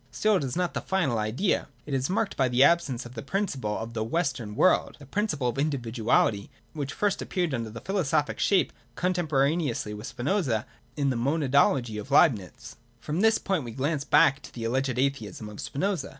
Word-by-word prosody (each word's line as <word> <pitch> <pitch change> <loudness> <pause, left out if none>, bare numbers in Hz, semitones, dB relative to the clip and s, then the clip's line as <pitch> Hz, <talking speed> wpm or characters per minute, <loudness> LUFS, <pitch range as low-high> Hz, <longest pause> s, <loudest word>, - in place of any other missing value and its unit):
Still 215 -2 +2
it 155 - -2
is 130 -2 -3
not 180 -1 -1
the - - -2
final 165 -12 0
idea. 110 - 0 0.2
It 150 - -5
is 135 0 0
marked 200 +2 0
by 130 - +2
the 125 +2 +4
absence 140 -7 +2
of 120 - -10
the 115 - -6
principle 135 - -2
of 115 +1 -6
the 110 -1 -1
Western 125 -5 -2
World, 185 - +3
the 145 - -13
principle 155 - -1
of 120 - -4
individuality, 115 -7 +1 0.2
which 145 -3 -4
first 205 -2 0
appeared 175 -5 -1
under 115 -3 -2
a 115 +1 -9
philosophic 165 -7 0
shape, 195 -2 +2 0.2
contemporaneously 155 -9 0
with 105 +4 -7
Spinoza, 130 - -1 0.3
in 140 -2 +1
the - - -1
Monadology 135 -4 +2
of 120 - -12
Leibnitz. 120 - +2 0.2
From 155 +8 -2
this 225 0 +5
point 190 -7 -1
we 120 -2 -7
glance 140 +3 -1
back 145 -1 +4
to - - -12
the 115 - -7
alleged 130 +2 0
atheism 120 -6 -2
of 105 - -8
Spinoza. 180 +2 -2
135 Hz, 190 wpm, -27 LUFS, 120-170 Hz, 0.3 s, this